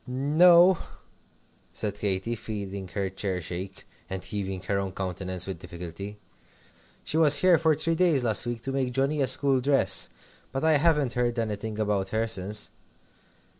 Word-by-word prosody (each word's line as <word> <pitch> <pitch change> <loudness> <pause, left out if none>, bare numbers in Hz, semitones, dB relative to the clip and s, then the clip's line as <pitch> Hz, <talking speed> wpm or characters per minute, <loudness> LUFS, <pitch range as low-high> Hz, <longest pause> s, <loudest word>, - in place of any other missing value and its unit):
"No," 170 +7 +5 0.9
said 105 -2 -3
Katy, 100 +2 -2
feeling 100 -4 -6
her 100 +1 -3
chair 95 -1 -3
shake, 90 +3 -7 0.2
and 95 -1 -5
keeping 95 -3 -4
her 100 +1 -1
own 95 -1 -4
countenance 95 -1 -2
with 95 -4 -6
difficulty, 90 +5 -8 0.9
"she 155 - -1
was 150 -3 +7
here 180 -3 +5
for 160 -1 +3
three 165 +3 -1
days 165 -6 +2
last 115 0 +2
week 120 -1 -4
to 135 - -4
make 130 -2 -2
Johnnie 140 +3 0
a 135 - +2
school 135 -2 +3
dress. 140 +1 +2 0.4
But 135 +2 -3
I 160 -1 +4
haven't 150 -4 +2
heard 120 -1 -1
anything 110 -1 -3
about 105 -3 -1
her 110 +3 -1
since. 105 0 0
110 Hz, 160 wpm, -26 LUFS, 95-140 Hz, 0.9 s, was